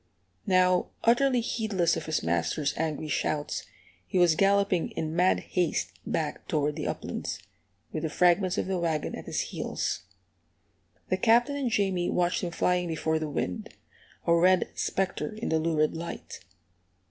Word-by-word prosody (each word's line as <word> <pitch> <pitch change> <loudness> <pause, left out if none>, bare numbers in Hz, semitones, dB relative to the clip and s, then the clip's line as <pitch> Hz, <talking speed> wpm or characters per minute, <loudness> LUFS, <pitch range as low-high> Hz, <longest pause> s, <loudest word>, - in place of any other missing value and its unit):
Now, 185 -1 +4 0.2
utterly 245 +2 +4
heedless 210 -7 0
of - - -5
his 160 - 0
master's 85 - 0
angry 155 -1 -2
shouts, 150 0 -2 0.4
he - - -1
was 175 -2 +5
galloping 195 0 +2
in 160 0 -3
mad 180 +2 +3
haste 165 - -1 0.2
back 155 -2 -2
toward 150 -1 0
the - - -3
uplands, - - -4 0.5
with 155 - -3
the 160 - -1
fragments 180 +3 +3
of - - 0
the 190 -1 -1
wagon 160 -3 -1
at - - -7
his - - -1
heels. - - -3 1.1
The 185 - +2
Captain 240 +6 +4
and 275 -3 -1
Jamie 195 -5 +1
watched 175 0 +1
him 175 - -1
flying 180 +1 +1
before 160 -1 0
the 155 -1 -3
wind, 90 -10 -3 0.6
a 170 - +4
red 180 +2 +4
spectre 195 +3 -2
in 220 - -4
the 160 - +2
lurid 155 -1 +1
light. 170 +1 -6
175 Hz, 155 wpm, -28 LUFS, 155-190 Hz, 1.1 s, was